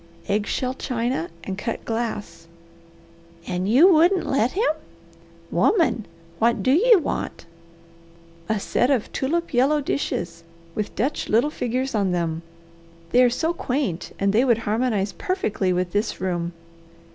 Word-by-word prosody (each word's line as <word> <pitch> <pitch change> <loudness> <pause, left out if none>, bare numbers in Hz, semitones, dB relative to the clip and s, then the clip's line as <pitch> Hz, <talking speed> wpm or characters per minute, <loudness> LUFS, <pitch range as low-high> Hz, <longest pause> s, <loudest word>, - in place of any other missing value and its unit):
"Egg 205 +1 0
shell 255 0 -1
china 240 -8 -2
and 190 0 -5
cut 230 - -4
glass." 210 -7 -4 1.0
"And 185 +2 -2
you 270 +11 +7
wouldn't 345 +4 +4
let 255 -2 +1
him! 415 -2 +2 0.8
Woman! 325 - +2 0.3
What 235 +1 +2
do 260 - +3
you 440 - +6
want?" 335 - -3 1.0
"A 220 -1 +1
set 245 +5 +1
of 260 -6 0
tulip 335 +5 -1
yellow 270 +5 +3
dishes, 170 - -3 0.3
with 210 +2 -4
Dutch 275 +6 -1
little 235 +8 +3
figures 255 0 -2
on 200 -4 +1
them. 165 -2 -1 0.7
They 250 - +5
are 250 - +6
so 320 +8 0
quaint 250 - -2
and 200 0 +1
they 230 +4 +4
would 240 -4 +3
harmonize 210 -2 0
perfectly 295 - -1
with 180 0 -1
this 205 +3 -1
room." 175 -2 -2
235 Hz, 140 wpm, -23 LUFS, 195-275 Hz, 1.0 s, you